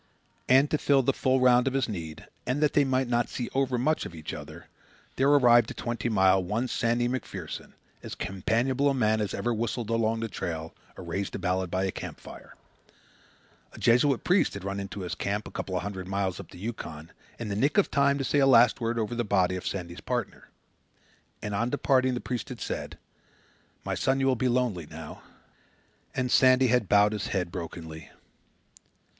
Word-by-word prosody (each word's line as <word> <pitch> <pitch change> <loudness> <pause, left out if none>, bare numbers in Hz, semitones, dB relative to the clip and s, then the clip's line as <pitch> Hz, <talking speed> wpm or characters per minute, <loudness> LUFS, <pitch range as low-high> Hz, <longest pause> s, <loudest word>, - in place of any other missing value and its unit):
And 135 +3 +6
to 155 - +1
fill 140 -2 +3
the 135 - +2
full 130 0 +1
round 125 0 +5
of 135 - 0
his 135 - +1
need, 85 -8 -7 0.2
and 130 +3 0
that 150 - +2
they 145 - +4
might 130 -1 +1
not 120 -1 0
see 120 - -4
overmuch 135 +2 +1
of 85 - -8
each 80 -1 -7
other, - - -9 0.5
there 135 +2 +3
arrived 120 -5 +5
at - - -8
Twenty 120 0 -2
Mile 95 -3 +4
one 110 +8 -1
Sandy 120 0 0
MacPherson, 130 +1 -5 0.3
as - - -7
companionable 120 +9 0
a 135 - 0
man 110 -3 +2
as 100 -3 -2
ever 120 - -1
whistled 115 0 -3
along 115 0 +1
the 115 - -2
trail 80 -5 -5 0.2
or - - -8
raised 95 +3 -3
a - - -1
ballad 95 0 -1
by 95 +2 -1
a 95 - 0
camp - - -7
fire. - - -12 1.2
A - - -12
Jesuit 125 +3 +3
priest 185 - +2
had 100 - -7
run 100 0 -3
into 100 0 -6
his 90 - -4
camp, 105 +2 -3
a - - -10
couple 95 - -4
of 90 - -1
hundred 95 -2 -5
miles 95 -1 -2
up - - -9
the - - -13
Yukon, 85 -7 -7 0.3
in 115 -3 -5
the 100 - -2
nick 140 - +1
of 205 - +3
time 140 0 +3
to 135 - -2
say 145 +2 +1
a 135 - +5
last 120 -1 +5
word 115 +1 -1
over 115 +1 -1
the 120 0 -1
body 95 -4 +1
of 90 - -5
Sandy's 85 -2 -5
partner. - - -4 0.9
And 105 -1 -3
on 115 +4 0
departing, 130 -2 +2
the 125 - -4
priest 125 +1 -4
had 125 -3 -7
said, - - -5 0.9
"My - - -2
son, 135 +1 +1
you 135 - +1
will 135 -1 +3
be 130 +2 0
lonely 120 -10 0
now." - - -9 0.9
And 125 -1 -1
Sandy 130 -1 +5
had 125 -5 +2
bowed 105 +1 +5
his 105 - -3
head 90 -3 -2
brokenly. 80 -2 -7
115 Hz, 200 wpm, -27 LUFS, 95-130 Hz, 1.2 s, And